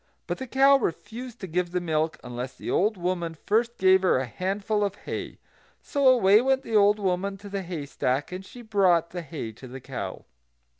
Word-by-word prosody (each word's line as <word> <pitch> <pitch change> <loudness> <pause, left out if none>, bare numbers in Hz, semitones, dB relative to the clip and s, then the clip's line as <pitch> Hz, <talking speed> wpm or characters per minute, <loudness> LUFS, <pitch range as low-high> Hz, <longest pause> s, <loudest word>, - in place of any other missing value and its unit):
But - - -4
the 260 - -5
cow 275 +2 +5
refused 230 +3 -5
to - - -4
give 175 +1 -1
the 180 +1 -1
milk 160 -2 -1
unless 125 +1 -6
the - - -5
old 210 +2 +2
woman 175 -2 -2
first 230 +3 +1
gave 190 0 +5
her 185 - +3
a 130 - -1
handful 200 - -1
of 200 -1 -1
hay. - - -6 0.4
So 280 -2 0
away 220 -5 +6
went 265 +1 +1
the 225 - -3
old 205 0 +5
woman 195 0 -1
to 200 +1 -11
the 200 0 -3
haystack; 145 -5 -2
and 185 +1 -6
she 240 +5 -12
brought 185 -6 +2
the 175 - -4
hay 145 -7 -6
to 130 +4 -12
the 130 +2 -8
cow. - - -6
190 Hz, 200 wpm, -26 LUFS, 170-215 Hz, 0.4 s, away